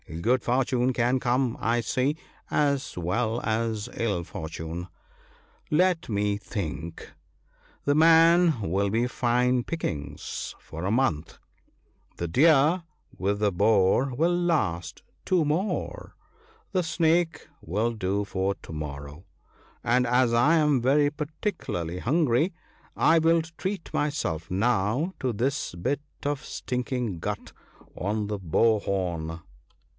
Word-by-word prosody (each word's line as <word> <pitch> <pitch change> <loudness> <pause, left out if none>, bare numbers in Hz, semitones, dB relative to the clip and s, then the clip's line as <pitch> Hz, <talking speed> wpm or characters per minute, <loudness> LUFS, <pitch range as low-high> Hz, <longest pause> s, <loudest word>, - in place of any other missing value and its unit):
Good 125 +7 +2
fortune 125 0 +1
can 125 +2 +2
come, 125 0 +1
I 120 +1 +2
see, 130 +7 0 0.3
as 140 -6 0
well 110 +7 0
as 110 -1 -1
ill 100 -7 -1
fortune. 80 +2 -6 0.8
Let 170 0 +2
me 105 -1 0
think: 85 -6 -6 0.3
— - - -33
the 145 - +3
man 165 -2 +5
will 100 +2 0
be 115 +4 +1
fine 125 0 +1
pickings 80 - -4
for 80 +1 -8
a 100 - 0
month; 110 - 0 0.8
the 85 - -2
deer 155 - +4 0.3
with 100 +2 0
the 105 -1 +2
boar 105 +6 +3
will 165 +7 +2
last 150 - -1 0.2
two 180 -4 +2
more; 170 +8 -2 0.6
the 185 -3 +1
snake 165 0 +1
will 105 +8 -1
do 100 -1 -1
for 95 0 -1
to 80 - -11
morrow; 75 +1 -7 0.6
and, 125 +1 +3
as 125 0 +3
I 140 +8 +4
am 150 -5 +3
very 145 +4 +3
particu 155 +6 -4
larly 85 +1 -3
hungry, 150 - +2 0.4
I 165 +1 +5
will 165 +1 +3
treat 190 -2 -4
myself 85 - -1
now 115 - +1
to 130 - 0
this 125 +2 -1
bit 140 +12 -1 0.2
of 145 0 -2
stink 125 -2 -4
ing 120 -9 -2
gut 105 +4 -5 0.4
on 105 +2 -2
the 105 -1 -3
bow 105 +5 +3
horn." 85 -5 -3
120 Hz, 130 wpm, -26 LUFS, 95-150 Hz, 0.8 s, man